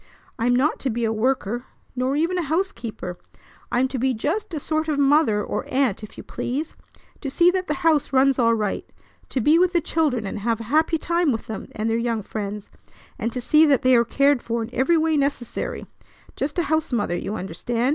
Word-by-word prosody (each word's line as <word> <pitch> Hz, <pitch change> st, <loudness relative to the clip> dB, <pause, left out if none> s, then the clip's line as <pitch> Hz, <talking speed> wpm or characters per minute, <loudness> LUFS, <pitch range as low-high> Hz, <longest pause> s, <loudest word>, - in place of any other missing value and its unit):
I'm 245 Hz, +2 st, +2 dB
not 280 Hz, +5 st, +1 dB
to 270 Hz, -, -2 dB
be 235 Hz, 0 st, -1 dB
a 220 Hz, -, 0 dB
worker, 240 Hz, 0 st, -1 dB, 0.3 s
nor 255 Hz, +2 st, 0 dB
even 335 Hz, +4 st, +1 dB
a 320 Hz, -5 st, -3 dB
housekeeper. 230 Hz, -, -3 dB, 0.5 s
I'm 245 Hz, +2 st, +2 dB
to 260 Hz, -, -3 dB
be 260 Hz, +1 st, +1 dB
just 370 Hz, -, -2 dB
a 315 Hz, -, -3 dB
sort 315 Hz, +2 st, -1 dB
of 300 Hz, -2 st, 0 dB
mother, 280 Hz, -7 st, +3 dB
or -, -, -4 dB
aunt, 260 Hz, -7 st, +1 dB
if 215 Hz, -, -11 dB
you -, -, -8 dB
please, 290 Hz, +6 st, -4 dB, 0.4 s
to 280 Hz, -, -4 dB
see 345 Hz, +6 st, +4 dB
that 370 Hz, 0 st, -2 dB
the 300 Hz, -, 0 dB
house 310 Hz, -4 st, +3 dB
runs 270 Hz, 0 st, +3 dB
all 230 Hz, -1 st, +4 dB
right, 210 Hz, -3 st, -2 dB, 0.5 s
to 265 Hz, -, -1 dB
be 300 Hz, +8 st, +4 dB
with 365 Hz, 0 st, +3 dB
the 345 Hz, -, +4 dB
children 295 Hz, -9 st, 0 dB
and 200 Hz, -, -4 dB
have 230 Hz, +2 st, 0 dB
a -, -, -5 dB
happy 320 Hz, +1 st, +3 dB
time 340 Hz, -1 st, +1 dB
with 225 Hz, -, -3 dB
them 220 Hz, -, -6 dB
and 215 Hz, +1 st, -2 dB
their 225 Hz, 0 st, +1 dB
young 230 Hz, -2 st, -1 dB
friends, 205 Hz, -1 st, -5 dB, 0.5 s
and 230 Hz, -, -1 dB
to 250 Hz, -, -3 dB
see 305 Hz, +5 st, +4 dB
that 275 Hz, -1 st, +3 dB
they 255 Hz, 0 st, +5 dB
are 235 Hz, -, +5 dB
cared 275 Hz, +2 st, +2 dB
for 230 Hz, 0 st, -2 dB
in 225 Hz, -, -8 dB
every 265 Hz, +7 st, +3 dB
way 320 Hz, 0 st, +2 dB
necessary; 275 Hz, -4 st, -2 dB, 0.5 s
just 285 Hz, +4 st, -3 dB
a 345 Hz, -, +2 dB
housemother, 275 Hz, -, 0 dB
you 205 Hz, -, -3 dB
understand. 230 Hz, +7 st, -2 dB
260 Hz, 215 wpm, -23 LUFS, 230-310 Hz, 0.5 s, they